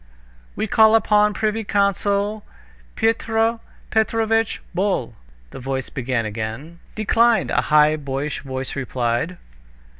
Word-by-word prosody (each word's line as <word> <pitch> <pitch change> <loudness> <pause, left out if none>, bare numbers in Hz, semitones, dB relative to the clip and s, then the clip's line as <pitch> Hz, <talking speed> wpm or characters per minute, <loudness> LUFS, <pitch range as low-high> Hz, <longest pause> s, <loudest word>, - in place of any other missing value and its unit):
"We - - -1
call 220 0 +5
upon 210 -1 +4
the - - -9
privy 220 +1 -1
councilor 200 +1 0 0.5
Pyotr 225 0 +1 0.3
Petrovitch 225 0 +1
Bol," 190 +2 -1 0.4
the - - -9
voice 130 0 -4
began 125 -3 -2
again. 110 +10 -6 0.2
"Declined!" 230 +2 +2
a - - +2
high 150 0 +4
boyish 140 0 -4
voice 130 -1 -6
replied. 130 +5 -2
200 Hz, 115 wpm, -21 LUFS, 135-220 Hz, 0.5 s, call